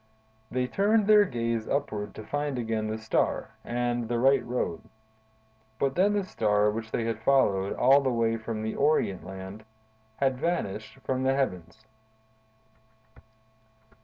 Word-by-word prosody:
"They 125 0 0
turned 205 - +2
their 210 0 +6
gaze 115 - -2
upward 105 -8 -2
to 110 - -8
find 145 -2 -2
again 110 -2 -2
the 110 0 -3
Star, 110 0 -1
and 120 -1 -2
the 120 - 0
right 135 +3 +4
road; 120 -9 -2 1.0
but 135 +2 0
then 195 +5 +3
the 205 -1 +1
Star 105 - +2
which 110 +1 -5
they 115 - -1
had 115 -1 -2
followed 100 -7 +2
all 135 +3 +5
the 135 - 0
way 115 -2 +1
from 110 -1 -5
the 110 - -2
Orient 95 -8 -1 0.5
had 135 -2 +1
vanished 135 - -2
from 130 -1 -1
the 135 0 +2
heavens." 100 -5 -3
120 Hz, 140 wpm, -28 LUFS, 110-140 Hz, 1.0 s, their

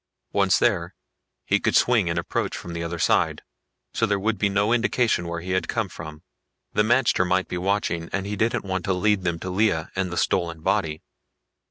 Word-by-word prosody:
Once 95 -2 +3
there, 90 -7 +1 0.5
he - - +2
could - - 0
swing 115 -8 +4
and 85 - -1
approach 85 - -2
from 85 - -8
the 85 0 -3
other 85 +1 -4
side, - - +1 0.5
so 115 - +1
there 100 -1 +1
would 105 +1 -1
be 100 - +2
no 100 +3 +2
indication 120 -6 +1
where 85 0 -4
he 90 +2 -5
had 95 0 0
come 115 -3 -1
from. 80 -2 -10 0.5
The - - +3
magter 120 -1 +3
might 90 +1 +1
be 90 - -3
watching 90 -3 -1
and 100 -1 -2
he 105 +1 -3
didn't 110 +1 0
want 95 -2 -2
to 95 - +1
lead 105 +2 +2
them 85 -2 -1
to 95 - -4
Lea 95 -4 +2
and 95 -1 -1
the 90 - -4
stolen 85 0 0
body. 80 -1 0
95 Hz, 205 wpm, -24 LUFS, 85-105 Hz, 0.5 s, swing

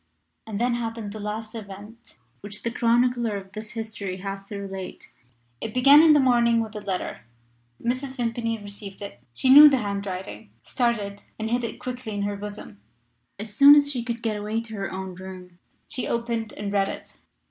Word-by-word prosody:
And 210 -2 -4
then 245 +1 +2
happened 230 -3 -4
the 215 - -7
last 215 +2 -5
event 215 +2 -11 0.2
which 205 +1 -8
the 235 - -1
chronicler 235 -2 +2
of 190 -1 -10
this 215 +1 -7
history 215 -4 -5
has 195 +1 -6
to 205 - -6
relate. 195 -2 -7 0.5
It 220 - -5
began 275 +4 +8
in 320 -1 +7
the 295 - +5
morning 240 -3 +4
with 220 -1 -4
a - - -3
letter. 190 -3 -3 0.6
Mrs. 255 +3 -2
Vimpany 230 -1 -1
received 205 -1 -8
it. 120 -12 -9
She 260 - +3
knew 295 +2 +11
the 275 - +2
handwriting, 195 - -5
started, 210 - -1 0.2
and 220 +1 -3
hid 245 0 +1
it 230 - -4
quickly 250 -3 -5
in 200 - -1
her 205 0 -2
bosom. 200 - -8 0.6
As 210 +1 -7
soon 280 +6 +9
as 285 -1 +5
she 245 -4 -2
could 235 -1 -4
get 220 -2 0
away 210 +2 -2
to 230 -1 -9
her 195 -2 -4
own 190 0 -5
room 180 -1 -10 0.3
she 270 -4 -3
opened 230 -2 -2
and 205 -1 -5
read 195 -1 +2
it. - - -8
220 Hz, 190 wpm, -25 LUFS, 200-235 Hz, 0.6 s, knew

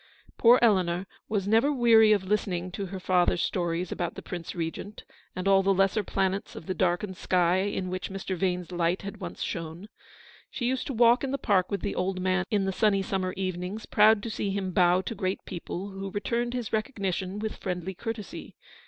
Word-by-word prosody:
Poor 240 +1 +7
Eleanor 185 -5 +3 0.2
was 200 -3 -1
never 225 +7 +4
weary 230 -5 +6
of 205 -3 +3
listening 185 -3 -1
to 195 +1 -4
her 190 +1 -6
father's 180 -1 +2
stories 175 -1 -1
about 175 -1 -3
the - - -8
Prince 175 +1 -6
Regent, 170 +5 -5 0.3
and 185 +1 -3
all 195 -1 +6
the 195 0 +2
lesser 195 +3 +2
planets 195 +1 -1
of - - -9
the 185 - -2
darkened 185 +1 0
sky 180 0 +2
in 190 -1 -1
which 185 0 -4
Mr. 195 -1 -4
Vane's 180 -1 -1
light 175 +1 0
had 200 - -6
once - - -6
shone. 170 +3 -5 0.6
She 240 - -4
used 255 +1 -1
to 275 - -3
walk 235 +2 +5
in 275 - -1
the 275 - -1
park 195 -7 +2
with 200 - -2
the 200 - -2
old 185 +1 -1
man 185 0 +1
in 205 -4 +1
the 190 - 0
sunny 200 -1 +2
summer 185 -1 -2
evenings, 185 +3 -3
proud 210 0 +5
to 230 - -4
see 205 - -2
him 195 -1 -2
bow 180 0 +4
to 210 - -5
great 190 -2 -3
people, 185 +1 -5
who 195 0 -5
returned 235 +5 -2
his 240 -4 -4
recognition 200 -4 -2
with 215 +1 -4
friendly 180 0 -4
courtesy. 225 +1 -7
195 Hz, 200 wpm, -27 LUFS, 180-210 Hz, 0.6 s, Poor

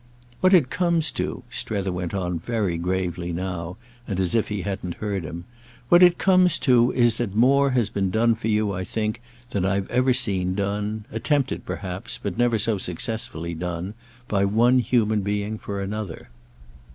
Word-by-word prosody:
"What 185 - +4
it 145 -8 +3
comes 170 -5 +1
to," - - -3
Strether 100 -3 -2
went 90 +1 -3
on 90 -3 -2
very 105 -2 -1
gravely 90 -1 -2
now 90 0 -4 0.3
and 95 -3 -2
as 95 +1 +1
if 115 -2 +2
he 105 -3 -3
hadn't 95 -2 -4
heard 100 -4 -3
him, 85 +2 -6 0.5
"what 175 - +7
it 175 -1 +7
comes 185 -2 +4
to 125 -2 +5
is 120 -3 +3
that 110 -5 -3
more 140 +5 +4
has 110 -4 +1
been 95 -1 0
done 115 +4 +3
for 110 0 -4
you, 105 -1 +1
I 95 -1 -3
think, 110 +4 -3 0.3
than 100 - -1
I've 95 0 0
ever 130 +1 +3
seen 95 -7 0
done—attempted 105 +7 -2
perhaps, 95 -1 -5
but - - -4
never 120 -1 +2
so 105 -1 +1
successfully 85 -2 -4
done—by 100 +6 -4
one 115 +6 +4
human 110 -4 +2
being 105 +2 -2
for 100 -1 -5
another." 100 -7 -5
105 Hz, 165 wpm, -24 LUFS, 95-120 Hz, 0.5 s, what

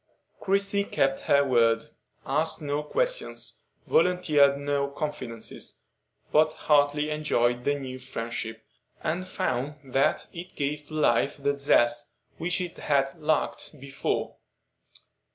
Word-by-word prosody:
Christie 200 +1 +1
kept 135 -6 +1
her 140 0 +6
word,—asked 120 +6 0
no 145 -1 -2
questions, - - -2 0.2
volunteered 155 - +4
no 140 0 0
confidences, 140 -5 -6 0.5
but 155 0 +4
heartily 150 0 +2
enjoyed 125 -5 +1
the 145 - +2
new 130 -2 -6
friendship, 115 -3 -5 0.4
and 180 +4 -2
found 150 -7 -2 0.2
that 135 - +2
it 180 +1 -9
gave 145 +1 -2
to 155 - -8
life 140 -2 +2
the 140 0 0
zest 120 -4 +2 0.3
which 175 +3 0
it 180 -2 -6
had 135 -1 0
lacked 155 -1 -1
before. 135 0 -3
145 Hz, 115 wpm, -27 LUFS, 130-155 Hz, 0.5 s, her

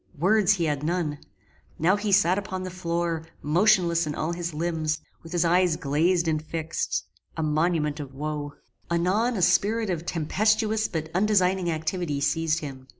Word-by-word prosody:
Words 200 +5 +4
he 180 -4 -1
had 145 -3 -1
none. 155 -2 -1 0.6
Now 175 +5 +3
he 205 0 -2
sat 190 -1 +4
upon 190 -2 -5
the 185 - -5
floor, 170 -2 -2 0.2
motionless 170 0 +3
in 150 - -3
all 160 +2 -2
his 170 0 -4
limbs, 155 -1 -1 0.2
with 165 - -12
his 175 -1 +1
eyes 175 0 +3
glazed 165 +5 +1
and 155 -1 +1
fixed; 160 +1 -3 0.3
a 160 - -1
monument 155 -1 0
of 140 -2 -8
woe. 145 0 -4 0.4
Anon 190 +8 +1
a 185 - 0
spirit 215 +2 +2
of 170 -1 -4
tempestuous 215 +6 +1
but 160 -2 -4
undesigning 190 -2 +2
activity 160 -1 -2
seized 160 +2 0
him. 130 -3 -8
170 Hz, 160 wpm, -26 LUFS, 155-185 Hz, 0.6 s, Words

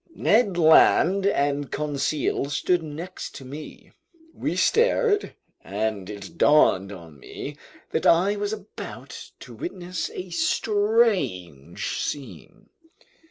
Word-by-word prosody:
Ned 205 -4 +2
Land 175 +4 +5
and 145 -5 0
Conseil 145 -1 -1
stood 175 +4 +1
next 160 +4 -7
to 135 - -9
me. 145 +4 -10 0.4
We - - -3
stared, 460 -2 +2 0.3
and 105 -1 -3
it 100 -2 -9
dawned 100 -10 +4
on 85 -6 -12
me - - -8 0.4
that - - 0
I 185 +5 +4
was 205 0 -2
about 215 -1 -8
to - - -11
witness 180 - -5
a 185 -1 -7
strange 205 - 0
scene. 140 -2 -7
160 Hz, 110 wpm, -24 LUFS, -, 0.4 s, Land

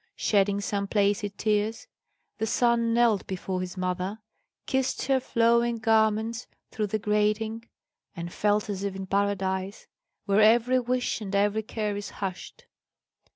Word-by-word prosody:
Shedding 200 -1 +1
some 200 +1 -2
placid 205 0 0
tears, 215 - 0 0.5
the 220 - 0
son 235 0 +2
knelt 230 -3 +2
before 185 0 -3
his 185 +1 -6
mother, 185 +2 -2 0.5
kissed 265 -1 -1
her 270 -1 +3
flowing 235 -1 +2
garments 220 +1 +1 0.2
through 215 -2 -2
the 215 - -1
grating, 215 +2 0 0.5
and 170 -1 -6
felt 210 0 +1
as 200 -2 -4
if 200 -1 -3
in 195 0 -5
paradise, 195 0 -1 0.4
where 200 +1 +3
every 235 +4 +5
wish 250 -1 -1
and 200 -1 -4
every 205 +2 +2
care 215 -1 -3
is 205 0 -5
hushed. 195 - -7
210 Hz, 140 wpm, -27 LUFS, 200-230 Hz, 0.5 s, every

